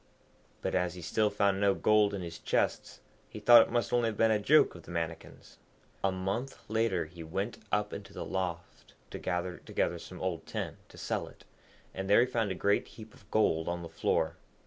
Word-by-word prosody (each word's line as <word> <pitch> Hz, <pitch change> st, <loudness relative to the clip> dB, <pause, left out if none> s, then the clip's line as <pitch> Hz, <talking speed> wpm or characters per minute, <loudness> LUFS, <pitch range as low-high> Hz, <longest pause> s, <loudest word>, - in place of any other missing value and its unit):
But -, -, -1 dB
as 90 Hz, -1 st, 0 dB
he 90 Hz, -, -8 dB
still 105 Hz, +5 st, +1 dB
found 100 Hz, -1 st, +1 dB
no 100 Hz, -1 st, +4 dB
gold 105 Hz, -1 st, +3 dB
in 95 Hz, -, -4 dB
his 85 Hz, -1 st, -7 dB
chests, -, -, -1 dB, 0.3 s
he -, -, -8 dB
thought 115 Hz, +2 st, +9 dB
it -, -, 0 dB
must 120 Hz, 0 st, 0 dB
only 120 Hz, -1 st, +3 dB
have 110 Hz, -, -6 dB
been 115 Hz, 0 st, +4 dB
a 110 Hz, -, +3 dB
joke 150 Hz, +9 st, +5 dB
of 85 Hz, -, -11 dB
the -, -, -16 dB
Mannikin's. 80 Hz, -1 st, -6 dB, 0.4 s
A 95 Hz, -, +3 dB
month 100 Hz, +8 st, -3 dB
later 110 Hz, -6 st, +1 dB
he 85 Hz, +2 st, -12 dB
went 95 Hz, +8 st, -4 dB
up 105 Hz, 0 st, 0 dB
into 100 Hz, -, -8 dB
the -, -, -6 dB
loft 90 Hz, -2 st, -5 dB, 0.2 s
to -, -, -6 dB
gather 90 Hz, +1 st, -2 dB
together 85 Hz, -, -2 dB
some 90 Hz, +2 st, -10 dB
old 90 Hz, -3 st, -3 dB
tin -, -, -4 dB
to -, -, -15 dB
sell -, -, -2 dB
it, -, -, -16 dB, 0.5 s
and 95 Hz, +1 st, -4 dB
there 105 Hz, -, +7 dB
he -, -, +4 dB
found 115 Hz, -4 st, -1 dB
a 95 Hz, -, -2 dB
great 100 Hz, +2 st, +1 dB
heap 110 Hz, -1 st, -12 dB
of 100 Hz, -, -20 dB
gold 80 Hz, -8 st, +2 dB
on 85 Hz, 0 st, -2 dB
the 85 Hz, -, -7 dB
floor. 80 Hz, -, 0 dB
100 Hz, 215 wpm, -31 LUFS, 90-110 Hz, 0.5 s, thought